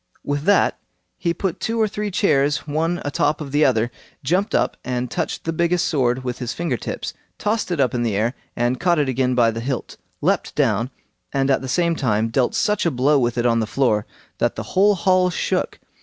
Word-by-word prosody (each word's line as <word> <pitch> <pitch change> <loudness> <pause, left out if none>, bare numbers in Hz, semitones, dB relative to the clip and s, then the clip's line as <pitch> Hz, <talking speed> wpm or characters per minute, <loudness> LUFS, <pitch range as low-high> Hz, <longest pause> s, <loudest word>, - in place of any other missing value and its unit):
With 145 +1 -2
that 205 - +3 0.4
he 170 - -1
put 175 0 -2
two 230 +1 -1
or 220 - +3
three 210 0 -3
chairs 145 - +2
one 165 +4 0
a 145 - -1
top 145 +1 +1
of 145 -3 -6
the 145 +2 +3
other, 120 -3 +2 0.3
jumped 180 +9 +1
up, - - +1
and 125 -1 -3
touched - - -3
the 165 - -2
biggest 170 +2 +1
sword 130 -4 +1
with 125 -1 -4
his 125 -1 -3
finger 165 -6 -1
tips, - - -5 0.2
tossed 215 0 -1
it 175 -4 -2
up 130 -4 +2
in 120 - 0
the 115 -4 0
air, 110 +4 +1 0.2
and 120 +1 0
caught 175 -1 +2
it 145 -2 +2
again 130 0 +1
by 115 -2 +4
the 115 - -5
hilt; 130 +1 -4 0.2
leapt - - 0
down, 115 +4 +1 0.4
and 135 0 +1
at 135 - +2
the 130 - -5
same 170 +3 +2
time 115 -6 +1
dealt 125 +2 +1
such 210 -1 +1
a 170 - +3
blow 140 +1 +3
with 120 -1 0
it 120 - +1
on 115 -1 +3
the 110 - -1
floor 110 -5 +1 0.3
that - - +1
the - - -4
whole 200 +2 +5
hall 185 -1 +3
shook. 175 - -1
140 Hz, 220 wpm, -21 LUFS, 120-170 Hz, 0.4 s, whole